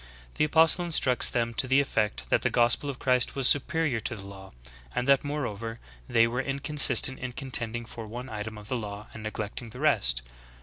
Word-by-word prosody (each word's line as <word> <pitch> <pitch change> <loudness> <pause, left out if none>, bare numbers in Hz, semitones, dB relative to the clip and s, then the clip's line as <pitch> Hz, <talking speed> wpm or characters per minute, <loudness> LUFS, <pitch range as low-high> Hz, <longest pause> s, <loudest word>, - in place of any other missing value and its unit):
' - - -24
The - - +3
apostle 160 +3 +3
instructs 145 -7 +3
them 115 -1 -2
to 130 - 0
the 135 +2 +3
effect 105 - -2
that - - +3
the - - 0
gospel 120 +4 +2
of 135 - -5
Christ 125 -2 +1
was 135 -2 +3
superior 145 -3 +2
to 120 - -3
the 100 - -10
law; 95 -1 -11 0.5
and 125 - -1
that 140 0 +3
more 145 -1 -3
over, 115 +1 -6 0.3
they 115 -1 +4
wxre 125 +3 -2
inconsistent 140 -1 +3
in 125 -1 -6
contending 120 -3 +1
for 115 0 -9
one 120 +4 -8
item 110 -2 -7
of 105 0 -11
the 125 - -2
law 105 -2 -8
and 110 - -9
neglecting 110 +2 -6
the 125 +3 -11
rest. 115 - +2
120 Hz, 210 wpm, -27 LUFS, 110-135 Hz, 0.5 s, they